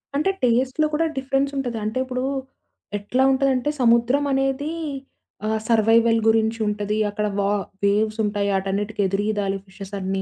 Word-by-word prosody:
అంటే 305 +7 +2
టేస్ట్‌లో 255 +5 +2
కూడా 320 +2 +2
డిఫరెన్స్ 270 +1 0
ఉంటది. 245 -4 -2
అంటే 215 +4 -2
ఇప్పుడు 255 0 -3 0.7
ఎట్లా 225 +6 0
ఉంటందంటే 270 0 +1
సముద్రం 240 +4 +3
అనేది 270 +3 0 0.7
ఆహ్, 220 0 0
సర్వైవల్ 225 0 +4
గురించి 225 0 +2
ఉంటది. 210 0 -1
అక్కడ 210 +1 -2
వా 200 0 +1 0.4
వేవ్స్ 215 +2 +1
ఉంటాయి. 205 -1 0
ఆటన్నిటికి 200 +2 -2
ఎదురీదాలి 200 0 -1
ఫిషెస్ 195 0 -11
అన్నీ. 190 0 -2
225 Hz, 135 wpm, -23 LUFS, 205-260 Hz, 0.7 s, సర్వైవల్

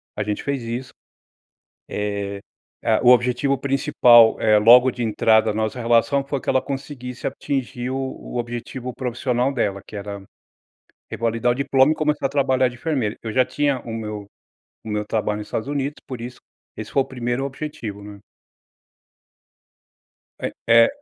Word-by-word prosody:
A 105 - -2
gente 105 0 -3
fez 140 -2 -2
isso. 120 +3 -5 1.0
Eh, 100 -1 -3 0.4
ah, 110 -1 +3
o 125 - +6
objetivo 125 +3 +3
principal, 130 -4 +5
é 105 -1 +4
logo 125 +4 +7
de 120 - -7
entrada 110 -1 +3
na 110 +1 -1
nossa 110 +3 -3
relação, 120 +4 +2
foi 140 0 -3
que - - -17
ela 130 - +3
conseguisse 135 -3 -6
atingir 125 -3 -3
o 130 - -2
o 130 -2 -5
objetivo 120 +1 -5
profissional 125 +1 -1
dela, 100 -6 -1
que - - -11
era 100 0 -6 0.9
revalidar 115 +1 0
o - - 0
diploma 135 +1 +3
e - - 0
começar 150 -2 0
a - - +2
trabalhar 130 -2 +2
de 120 - -11
enfermeira. 120 -6 -2
Eu 110 - -5
já 130 +3 +3
tinha 140 +1 0
o 115 - -7
meu 105 -2 -5 0.6
o 110 - -8
meu 105 0 -1
trabalho 105 0 -1
nos 105 - -8
Estados 110 - -3
Unidos, 145 0 -2
por 130 - -6
isso 120 +1 -7 0.4
esse 110 0 -6
foi 135 - +3
o - - -10
1º 125 0 -3
objetivo, 135 -7 -6
né. 100 0 -11 2.2
É - - -2 0.2
é - - +7
120 Hz, 165 wpm, -22 LUFS, 110-135 Hz, 2.2 s, logo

